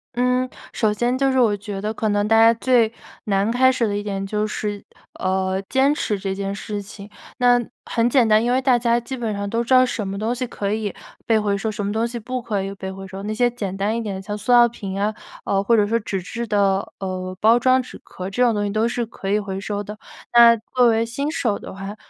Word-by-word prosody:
嗯。 250 +1 +1 0.2
首 215 -3 +1
先 240 +4 0
就 270 0 +2
是 260 - +2
我 225 -4 +3
觉 200 -1 -6
得， 215 +1 -2
可 215 -1 -1
能 205 0 +1
大 225 +1 +4
家 230 +1 +7
最 230 -1 +2 0.3
难 200 0 +1
开 260 +2 +4
始 240 -3 0
的 205 - -1
一 205 - -4
点 195 -1 -3
就 210 +2 -1
是， 210 -1 -4 0.4
呃， 190 0 0
坚 270 +2 +3
持 210 -8 -1
这 190 0 -3
件 195 0 -3
事 205 0 -5
情。 200 +1 -10 0.3
那 245 -1 +4 0.3
很 230 -1 +1
简 245 -2 +4
单， 215 +1 +4
因 240 - +1
为 255 +1 +2
大 255 -2 +4
家 235 0 +2
基 250 +3 -6
本 230 -3 -2
上 200 0 -3
都 230 +3 0
知 235 - 0
道 255 0 +7
什 220 -5 -3
么 195 +1 -4
东 220 +4 -1
西 255 +1 -3
可 205 -4 -4
以 215 -2 -2 0.3
被 225 -2 +3
回 205 -1 0
收， 215 +2 -2
什 205 -1 -4
么 200 - -1
东 225 +2 0
西 235 0 -5
不 250 +3 -4
可 210 -4 -2
以 195 0 -5
被 190 -1 -6
回 195 0 -9
收， 190 +1 -8
那 210 +1 -3
些 245 +3 +2
简 205 -6 -5
单 200 +3 -1
一 - - -2
点 205 -4 -4
的 190 - -6
像 205 +2 -5
塑 210 +4 -2
料 240 -1 +7
瓶 195 -4 -6
啊， 210 +2 0 0.3
呃， 195 - +1
或 230 +3 +3
者 210 -2 +3
说 230 +2 +1
纸 195 -3 -4
质 230 +6 -5
的， 200 -2 +1
呃， 185 -1 -4
包 225 +2 +6
装 255 +1 +3
纸 255 - -11
壳， 185 +1 -7
这 245 +6 +1
种 235 - +3
东 205 -1 -1
西 - - -1
都 220 +2 +1
是 240 0 -2
可 205 -3 -7
以 210 - +3
回 195 -2 -5
收 205 +1 -3
的。 210 +1 -8 0.4
那 235 -1 +8 0.2
作 250 -1 +5
为 225 0 +2
新 280 +6 -3
手 230 -10 0
的 - - -9
话， 195 +2 -7
215 Hz, 280 characters per minute, -21 LUFS, 200-240 Hz, 0.4 s, 那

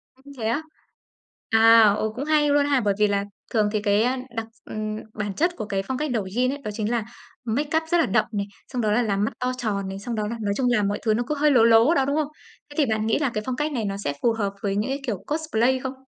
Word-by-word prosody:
Ưm, 275 +2 -15
Thế 230 - -6
á? 235 +7 0 0.9
À, 225 +1 +7 0.2
ờ, 215 - -1
cũng 275 - -4
hay 300 -1 +3
luôn 285 0 +3
ha, 285 -2 +2
bởi 205 -2 +1
vì 210 - +5
là 200 0 0 0.3
thường 215 -2 +3
thì 215 -1 -1
cái 205 +1 +2 0.3
đặc 225 - -2 0.2
ừm, 215 0 -4 0.2
bản 205 -2 -3
chất 345 - 0
của - - -4
cái 195 -2 -2
phong 260 +5 -3
cách 300 0 -2
Douyin 235 +4 0
ấy, 285 - -4
đó 210 - -4
chính 215 +1 -2
là 235 -3 0 0.4
makeup 290 +7 0
rất 345 - +4
là 330 - +3
đậm 215 - +2
này, 200 -1 -2 0.2
xong 250 -2 -3
đó 215 - +1
là 240 +4 +3
làm 200 -3 0
mắt 220 - -1
to 250 0 0
tròn 205 -5 -2
này, 195 0 -6
xong 230 +3 -4
đó 210 -1 -1
là 230 +2 -4
nói 205 -1 0
chung 255 -2 +1
là 230 -4 +2
mọi 200 +1 -1
thứ 220 - +2
nó 240 +3 0
cứ 300 - -1
hơi 295 0 +3
lố 240 -4 +5
lố 230 +6 +6
đó, 275 -5 +2
đúng 280 +2 0
không? 310 -2 +1 0.4
Thế 290 - -12
thì 300 - +4
bạn 220 -2 -1
nghĩ 225 - +1
là 285 -3 +1
cái 215 - -2
phong 255 - -2
cách 295 +4 -1
này 240 -6 -2
nó 195 -1 -2
sẽ 145 - -1
phù 235 - +3
hợp 200 -3 -2
với 200 -1 -1
những 215 +6 -1
cái 275 - -2
kiểu 200 -5 -3
cosplay 260 -5 +1
không? 265 0 -4
230 Hz, 285 wpm, -24 LUFS, 210-270 Hz, 0.9 s, À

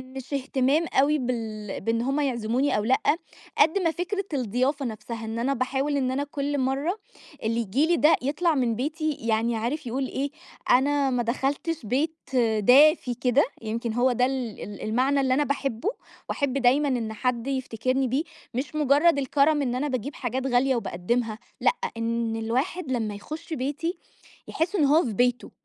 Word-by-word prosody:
مش 265 +1 -7
اهتمام 275 +3 +1
أوي 295 +3 +4
بال 225 -5 -4
بإن 230 +3 0
هم 270 +4 0
يعزموني 255 -1 0
أو 210 - 0
لأ، 255 +4 +3 0.6
قد 320 +6 +4
ما 335 -4 +1
فكرة 365 +4 -2
الضيافة 260 +3 0
نفسها. 225 0 -6
إن 225 +1 -4
أنا 270 +4 +1
باحاول 270 +3 -1
إن 260 -2 0
أنا 275 +2 -1
كل 285 0 -3
مرّة 275 +9 0 0.5
اللي 230 +1 0
ييجي 235 +7 +1
لي 345 - +3
ده 305 +1 +5
يطلع 305 +5 +1
من 245 -4 +1
بيتي 310 +5 -1
يعني 230 +1 0
عارف 245 +6 -3
يقول 260 +3 -2
إيه، 275 +2 -3 0.4
أنا 280 +2 +3
ما 250 -2 0
دخلتش 270 +4 -2
بيت 290 +8 0 0.4
دافي 265 - +5
كده، 250 +3 +3 0.2
يمكن 225 +1 -3
هو 245 +2 +3
ده 250 +1 +2
ال 255 -4 -3
ال 205 - -8
المعنى 260 +6 +1
اللي 260 -1 +2
أنا 295 - +3
باحبه، 275 - -1 0.4
وأحب 280 -3 -1
دايمًا 270 +3 +3
إن 235 -5 -1
حد 245 +1 -1
يفتكرني 260 0 -1
بيه. 265 +5 0 0.3
مش 260 +4 -4
مُجرّد 295 +2 +4
الكرم 285 +2 +2
إن 250 -3 -1
أنا 275 +4 -1
باجيب 265 +1 -3
حاجات 260 +1 -2
غالية 260 +1 +3
وباقدّمها 225 +2 -2 0.2
لأ، - - +4 0.2
إن 230 0 -1
الواحد 260 +8 -2
لمّا 220 -4 -1
يخُش 310 - -7
بيتي، 300 +6 -2 0.5
يحس 340 +5 -1
إن 315 -7 +3
هو 305 +5 +5
في 225 - -3
بيته. 245 +3 +1
260 Hz, 170 wpm, -26 LUFS, 235-285 Hz, 0.6 s, ده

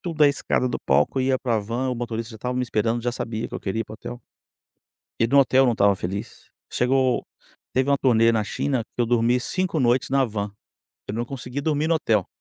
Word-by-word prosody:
da 150 -1 +6
escada 130 -2 0
do - - -2
palco, 135 - +2
ia 130 0 +2
para 120 -3 0
a 110 - +1
van, 120 +5 -2
o 125 - -2
motorista 115 -1 -4
já - - -9
estava 125 +3 -3
me 125 - 0
esperando, 115 0 0
já 120 +1 -1
sabia 115 -1 -4
que - - -14
eu - - -4
queria 110 +3 -2
ir - - -3
para 110 - -11
o - - -8
hotel. 120 +2 -8 1.0
E 115 - +3
no 140 +3 +5
hotel 135 0 +4
não 120 - +3
estava 100 -2 +3
feliz. 95 +3 -6 0.2
Chegou 130 0 +2 0.5
teve 130 +2 +1
uma 140 - +4
turnê 115 -3 +4
na 110 -2 +1
China 130 +3 -1
que - - 0
eu - - +2
dormi 120 +1 +2
5 180 +5 -1
noites 125 0 +2
na 135 0 +3
van, 105 -3 -4 0.6
eu 100 - -4
não 115 - -1
consegui 130 +1 -5
dormir 150 +1 0
no 165 - +3
hotel. 110 - +1
120 Hz, 230 wpm, -24 LUFS, 115-130 Hz, 1.0 s, da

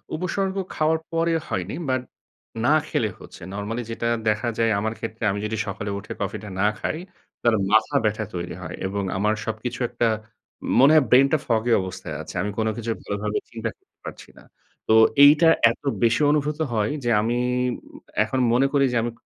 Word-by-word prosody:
উপসর্গ 190 +3 -2 0.2
খাওয়ার 160 +1 +2
পরে 165 0 +1
হয়নি, 90 +1 -3
বাট 130 -1 +1 0.6
না 150 - +5
খেলে 120 -9 0
হচ্ছে। - - -13
নরমালি 105 +4 -4
যেটা 115 +1 -2 0.2
দেখা 105 +2 0
যায় 115 -1 +2
আমার 110 +2 -2
ক্ষেত্রে 115 0 -6
আমি 100 - -3
যদি 110 +1 -2
সকালে 100 +1 -4
উঠে 100 - -7
কফি 100 +2 -2
টা 105 - -7
না 105 - +4
খাই 155 - -2 0.4
তাহলে 115 -2 +3
মাথা 110 0 +3
ব্যাথা 110 0 0
তৈরি 85 0 -4
হয় - - -6
এবং 100 +1 -3
আমার 105 +2 +2
সবকিছু 115 +2 -4
একটা, 120 -1 0 0.7
মনে 135 +3 +7
হয় 150 - +5
ব্রেইন 135 +2 +6
টা - - +5
foggy 115 0 +1
অবস্থায় 90 -4 -6
আছে। - - -9
আমি 105 +3 -2
কোন 110 - +1
কিছু 115 0 -3
ভালোভাবে 105 +1 -2
চিন্তা 115 -1 -3
করতে - - -46
পারছি - - -9
না। - - -15 0.4
তো - - +4 0.3
এইটা 155 +3 +7 0.2
এত - - -10 0.2
বেশি 115 +5 +3
অনুভূত 150 +1 0
হয় 110 -1 0
যে, 120 - 0
আমি 120 +2 0 0.5
উম - - -14 0.2
এখন 130 - -2
মনে 130 +3 +4
করি 140 -1 +4
যে 120 - +2
আমি 120 - -2
115 Hz, 185 wpm, -23 LUFS, 105-135 Hz, 0.7 s, মনে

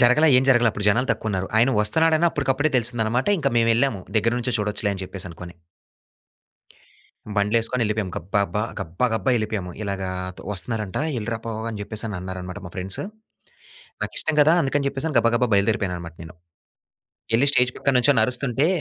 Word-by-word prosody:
జరగలా, 125 +7 +5
ఏం 130 - +2
జరగలా 120 -3 +5
అప్పుడు 105 -1 -4
జనాలు 125 +6 +2
తక్కువున్నారు. 95 -3 -3
ఆయన 120 +4 +4
వస్తన్నాడని 160 +9 +3
అప్పడుకప్పుడే 145 +1 0
తెలిసిందనమాట. 120 0 0
ఇంకా 140 -1 +1
మేమెళ్ళాము 115 -2 +2
దెగ్గర 115 +2 +2
నుంచే 125 0 -2
చూడొచ్చులే 105 0 -1
అని 95 -1 -6
చెప్పేసనుకోని. 90 -2 -7 1.8
బండ్లులేసుకొని 115 +4 +2
ఎళ్ళిపోయాము. 105 -4 -2
గబ్బా 100 +5 -1
బ్బా 105 +4 -1 0.2
గబ్బా 85 +10 -1
గబ్బా 120 +4 0
ఎళ్ళిపోయాము. 105 -4 -3
"ఇలాగ, 100 -2 -3 0.5
వస్తున్నారంట 105 0 -3 0.2
ఎళ్ళిరా 115 +1 -3
పో" 115 - -4 0.2
అని 110 -2 -5
జెప్పేసనన్నారన్నమాట 95 -3 -5
మా - - -9
ఫ్రెండ్సు. 95 +1 -2 1.0
నాకిష్టం 160 - 0
కదా! 155 +2 +5
అందుకని 140 +1 0
చెప్పేసి 140 +3 -3
గబా 115 - +3
గబా 125 0 +2
బయలుదేరిపోయానన్నమాట 100 -5 0
నేను. 80 0 -12 1.0
ఎళ్లి 140 +5 +3
స్టేజ్ 125 -3 +3
పక్కన 140 - +1
నుంచొని 125 -2 +3
అరుస్తుంటే 125 +3 0
110 Hz, 145 wpm, -23 LUFS, 100-125 Hz, 1.8 s, జరగలా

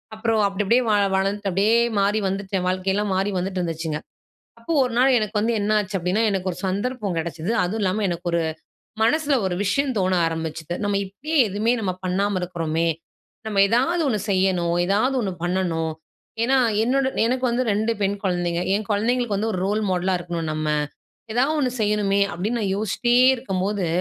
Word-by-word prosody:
அப்புறம் 220 0 0
அப்பிடி 195 +1 -2
அப்பிடியே 240 +6 +3
வாழ 205 -1 +3
வளர்ந்துட்டு 195 +1 0
அப்படியே 200 +5 +2 0.3
மாறி 205 +2 +2
வந்துட்டேன். 190 -1 -2
வாழ்க்கை 185 +1 -1
எல்லாம் 205 0 -1
மாறி 195 +2 0
வந்துட்டுருந்துச்சுங்க. 170 -4 -2 0.6
அப்ப, 230 - -24 0.2
ஒரு 250 - -3
நாள் 260 0 +5
எனக்கு 215 -1 -2
வந்து 230 +2 +1
என்னாச்சு 205 -1 0
அப்படின்னா 180 +5 0
எனக்கு 190 -1 -1
ஒரு - - -9
சந்தர்ப்பம் 205 0 -2
கிடைச்சது. 165 +3 -4
அதுவும் 210 +5 -2
இல்லாம 195 +2 0
எனக்கு 175 0 -3
ஒரு 170 -1 +2 0.6
மனசுல 290 +5 +2
ஒரு 180 - -1
விஷயம் 270 +7 +1
தோண 185 -1 +1
ஆரம்பிச்சது, 160 0 -4
"நம்ம 205 -1 0
இப்படியே 290 +12 -5
எதுவுமே 210 +4 +1
நம்ம 190 -4 -1
பண்ணாம 190 +1 0
இருக்குறோமே. 165 -2 -1 0.6
நம்ம 205 -2 +1
ஏதாவது 260 - +2
ஒண்ணு 220 -5 0
செய்யணும். 185 -3 +1
ஏதாவது 215 +8 +2
ஒண்ணு 200 -5 -2
பண்ணணும். 175 -3 -1 0.5
ஏன்னா, 265 +3 +3 0.3
என்னோட 265 +3 +1 0.2
எனக்கு 255 +2 -1
வந்து 240 +2 +1
2 215 +3 +1
பெண் 200 +1 +1
குழந்தைங்க, 175 -2 0
என் 210 +1 -2
குழந்தைங்களுக்கு 225 +1 +1
வந்து 220 +3 -1
ஒரு 185 - -2
ரோல் 210 +2 0
மாடலா 185 +1 +1
இருக்கணும், 170 -2 -4
நம்ம. 155 0 -2 0.7
ஏதாவது 270 +6 +2
ஒண்ணு 255 -3 +1
செய்யணுமே" 205 -1 +1
அப்பிடின்னு 215 +7 -2
நான் 195 -3 0
யோசிச்சிட்டே 220 +4 0 0.2
இருக்கும்போது, 195 -5 -2
200 Hz, 165 wpm, -23 LUFS, 180-225 Hz, 0.7 s, நாள்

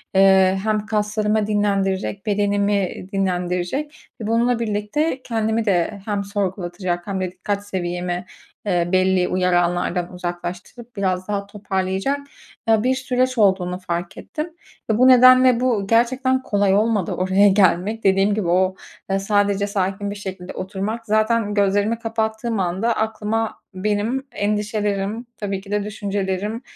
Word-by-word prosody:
eee, 190 0 +5
hem 215 -1 0
kaslarımı 210 0 0
dinlendirecek, 200 -1 0
bedenimi 200 -2 0
dinlendirecek 185 +9 -2
ve 215 - -3
bununla 235 +1 +2
birlikte 230 +7 -1
kendimi 225 -1 -1
de 195 +1 0
hem 205 -2 -1
sorgulatacak 185 -3 -3
hem 190 -2 -2
de 180 -1 -2
dikkat 200 +2 -4
seviyemi, 180 -1 -3 0.4
eee, 175 -3 +1
belli 185 -1 +3
uyaranlardan 175 -1 0
uzaklaştırıp 180 +7 -6
biraz 185 -2 -1
daha 200 -1 -2
toparlayacak, 195 +5 -2 0.5
eee, 220 -1 +4
bir 260 +1 +2
süreç 255 -1 0
olduğunu 185 -3 +2
fark 175 0 -4
ettim. 310 +2 -5 0.4
Eee, 220 - +2
bu 255 +2 +6
nedenle 255 -1 +7
bu 230 -6 0
gerçekten 260 +3 +2
kolay 200 -2 +2
olmadı 210 -3 +1
oraya 190 +2 +3
gelmek. 195 +3 +2
Dediğim 195 +1 +3
gibi 210 -4 -1
o, 185 +2 +2 0.3
aaa, 195 - +1
sadece 205 0 +1
sakin 200 0 -2
bir - - -5
şekilde 190 -2 -7
oturmak... 205 +5 -4
Zaten 215 0 +1
gözlerimi 205 +3 +1
kapattığım 225 -1 -2
anda 190 +6 0
aklıma 220 0 -2
benim 215 +7 -1
endişelerim, 210 +1 -1
tabii 195 -2 -3
ki 200 0 -12
de 205 -1 0
düşüncelerim, 205 +1 -3
205 Hz, 130 wpm, -21 LUFS, 190-220 Hz, 0.5 s, nedenle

